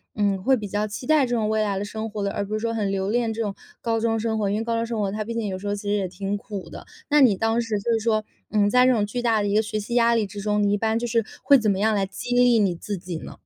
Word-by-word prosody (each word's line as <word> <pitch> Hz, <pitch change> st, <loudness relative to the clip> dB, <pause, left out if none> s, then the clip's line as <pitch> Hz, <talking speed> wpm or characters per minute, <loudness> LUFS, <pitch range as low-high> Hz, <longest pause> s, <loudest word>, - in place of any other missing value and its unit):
嗯， 200 Hz, -2 st, +1 dB
会 265 Hz, +7 st, +3 dB
比 215 Hz, -4 st, -5 dB
较 205 Hz, +2 st, -1 dB
期 215 Hz, +4 st, -7 dB
待 305 Hz, -2 st, +4 dB
这 245 Hz, -1 st, -1 dB
种 215 Hz, -2 st, 0 dB
未 220 Hz, 0 st, +1 dB
来 205 Hz, -2 st, 0 dB
的 195 Hz, -, -2 dB
生 220 Hz, +2 st, -5 dB
活 205 Hz, -1 st, -4 dB
的， 200 Hz, -, -1 dB
而 200 Hz, -, -2 dB
不 210 Hz, -, -6 dB
是 215 Hz, -, 0 dB
说 230 Hz, 0 st, -2 dB
很 210 Hz, -3 st, -1 dB
留 195 Hz, 0 st, -1 dB
恋 230 Hz, 0 st, 0 dB
这 225 Hz, -, -3 dB
种 205 Hz, -3 st, -2 dB, 0.3 s
高 230 Hz, -1 st, 0 dB
中 225 Hz, 0 st, +1 dB
生 220 Hz, 0 st, -1 dB
活， 205 Hz, -, 0 dB
因 205 Hz, -, 0 dB
为 225 Hz, -, -2 dB
高 230 Hz, 0 st, -1 dB
中 230 Hz, 0 st, 0 dB
生 230 Hz, -1 st, -3 dB
活， 200 Hz, -2 st, 0 dB
它 215 Hz, +1 st, -3 dB
毕 230 Hz, -, -4 dB
竟 230 Hz, -2 st, -2 dB
有 185 Hz, -1 st, -4 dB
时 205 Hz, -, -6 dB
候 205 Hz, -, 0 dB
其 200 Hz, -, -7 dB
实 205 Hz, -, -2 dB
也 200 Hz, -2 st, 0 dB
挺 195 Hz, +3 st, -3 dB
苦 200 Hz, -2 st, -7 dB
的。 -, -, -10 dB, 0.2 s
那 295 Hz, -, +5 dB
你 245 Hz, -8 st, +6 dB
当 225 Hz, +3 st, +1 dB
时 225 Hz, -2 st, -2 dB
就 230 Hz, +2 st, 0 dB
说， 215 Hz, -1 st, +1 dB, 0.3 s
嗯， 205 Hz, -1 st, +3 dB
在 250 Hz, +3 st, +5 dB
这 255 Hz, -, +5 dB
种 210 Hz, -3 st, +1 dB
巨 240 Hz, +4 st, -4 dB
大 225 Hz, -3 st, +2 dB
的 205 Hz, -, -1 dB
一 200 Hz, -, 0 dB
个 215 Hz, -, +5 dB
学 215 Hz, 0 st, -4 dB
习 235 Hz, +4 st, -4 dB
压 235 Hz, -1 st, +4 dB
力 220 Hz, -, +1 dB
之 205 Hz, +1 st, -8 dB
中， 210 Hz, 0 st, 0 dB
你 205 Hz, -, +2 dB
一 205 Hz, -, +2 dB
般 220 Hz, +1 st, 0 dB
就 235 Hz, -, -2 dB
是 230 Hz, -2 st, +1 dB, 0.2 s
会 280 Hz, -1 st, +7 dB
怎 220 Hz, -, +1 dB
么 195 Hz, -1 st, +1 dB
样 220 Hz, +1 st, +2 dB
来 200 Hz, -1 st, +1 dB
激 245 Hz, +5 st, -5 dB
励 245 Hz, -1 st, +5 dB
你 195 Hz, -4 st, +2 dB
自 200 Hz, +4 st, -5 dB
己 175 Hz, -2 st, -6 dB
呢？ -, -, -9 dB
215 Hz, 365 characters per minute, -24 LUFS, 205-230 Hz, 0.3 s, 会